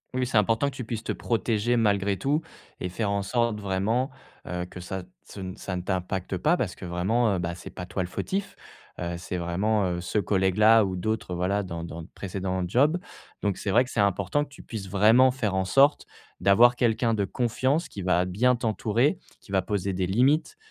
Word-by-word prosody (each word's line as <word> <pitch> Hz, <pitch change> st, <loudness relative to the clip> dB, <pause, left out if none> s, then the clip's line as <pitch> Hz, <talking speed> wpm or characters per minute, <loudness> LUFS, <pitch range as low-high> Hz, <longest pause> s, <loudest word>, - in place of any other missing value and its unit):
Oui, 130 Hz, -, +1 dB
c'est 120 Hz, -3 st, 0 dB
important 115 Hz, +7 st, +2 dB
que -, -, -14 dB
tu 125 Hz, -, -5 dB
puisses 115 Hz, -1 st, -4 dB
te -, -, -2 dB
protéger 115 Hz, 0 st, 0 dB
malgré 100 Hz, -3 st, +2 dB
tout 145 Hz, -, 0 dB, 0.4 s
et 90 Hz, -, -3 dB
faire 100 Hz, +2 st, -2 dB
en 100 Hz, 0 st, 0 dB
sorte 115 Hz, +1 st, 0 dB
vraiment, 105 Hz, +7 st, 0 dB, 0.4 s
heu, 90 Hz, 0 st, -3 dB
que 90 Hz, -, -10 dB
ça 95 Hz, +1 st, -5 dB, 0.2 s
ce 100 Hz, -, -11 dB
n 95 Hz, +1 st, -6 dB
ça 95 Hz, -4 st, -5 dB
ne 90 Hz, -, -4 dB
t'impactes 95 Hz, 0 st, -2 dB
pas 160 Hz, -, +2 dB
parce 100 Hz, -8 st, -2 dB
que -, -, -13 dB
vraiment, 95 Hz, +4 st, +1 dB
bah, 85 Hz, 0 st, -2 dB
c'est 90 Hz, -, -9 dB
pas 90 Hz, -, -7 dB
toi 90 Hz, +1 st, -3 dB
le 90 Hz, -, -3 dB
fautif, 195 Hz, -, -3 dB, 0.4 s
heu, 85 Hz, 0 st, -3 dB
c'est 90 Hz, 0 st, -4 dB
vraiment 90 Hz, +1 st, 0 dB
ce 95 Hz, -, -3 dB
collègue-là 105 Hz, +3 st, +4 dB
ou 95 Hz, -2 st, -2 dB
d'autres 105 Hz, -1 st, -2 dB
voilà 95 Hz, +4 st, 0 dB
dans 85 Hz, -3 st, -5 dB
dans 85 Hz, 0 st, -7 dB
de 80 Hz, -, -11 dB
précédent 95 Hz, -1 st, -3 dB
job. 145 Hz, -, +3 dB, 0.5 s
Donc 100 Hz, -2 st, 0 dB
c'est 100 Hz, -, -4 dB
vrai 120 Hz, +6 st, +5 dB
que -, -, -11 dB
c'est 115 Hz, -, -3 dB
important 100 Hz, +8 st, +1 dB
que 145 Hz, -, -10 dB
tu -, -, -14 dB
puisses 100 Hz, -4 st, -7 dB
vraiment 110 Hz, +7 st, +5 dB
faire 125 Hz, -6 st, -1 dB
en 95 Hz, 0 st, 0 dB
sorte 135 Hz, +9 st, +4 dB, 0.3 s
d'avoir 120 Hz, +5 st, +6 dB
quelqu'un 115 Hz, -1 st, +1 dB
de 100 Hz, -2 st, 0 dB
confiance 130 Hz, -, 0 dB
qui 100 Hz, -, -8 dB
va 90 Hz, 0 st, +2 dB
bien 120 Hz, +8 st, +2 dB
t'entourer, 115 Hz, -, +1 dB, 0.2 s
qui 100 Hz, -, -15 dB
va 95 Hz, -1 st, +2 dB
poser 100 Hz, 0 st, -2 dB
des 90 Hz, 0 st, -1 dB
limites, 140 Hz, -, +2 dB
100 Hz, 210 wpm, -26 LUFS, 95-120 Hz, 0.5 s, d'avoir